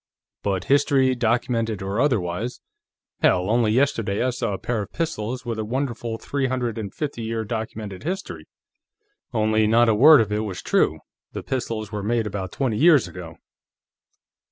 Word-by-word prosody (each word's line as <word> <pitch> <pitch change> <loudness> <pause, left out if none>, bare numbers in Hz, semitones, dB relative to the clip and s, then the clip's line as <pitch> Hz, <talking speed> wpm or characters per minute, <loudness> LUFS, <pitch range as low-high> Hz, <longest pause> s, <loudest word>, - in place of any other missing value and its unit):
But 95 -2 -1
history, 140 -2 +3
documented 115 -3 0
or 100 +4 -1
otherwise 110 -4 -1 0.6
hell, 90 +3 +3
only 115 -2 +3
yesterday 115 -5 +1
I 130 - +1
saw 115 -4 -2
a - - -2
pair 115 0 -2
of 100 - -7
pistols 125 -7 -3
with 115 -2 -3
a - - -1
wonderful 120 -1 -3
three 140 +3 -2
hundred 125 -3 -2
and 100 -3 -5
fifty 145 -6 -4
year 110 0 -3
documented 110 -3 -5
history. 190 +5 -5 0.8
Only 110 -1 +2
not 115 +2 +4
a - - +4
word 145 +8 +8
of 110 -2 0
it 105 - 0
was 95 -5 -6
true; - - +1 0.3
the - - -5
pistols 115 -5 -3
were 105 -1 -3
made 115 +2 0
about 95 -3 -4
twenty 125 -6 -1
years 150 -3 +5
ago." 85 -3 -9
115 Hz, 165 wpm, -23 LUFS, 105-130 Hz, 0.8 s, word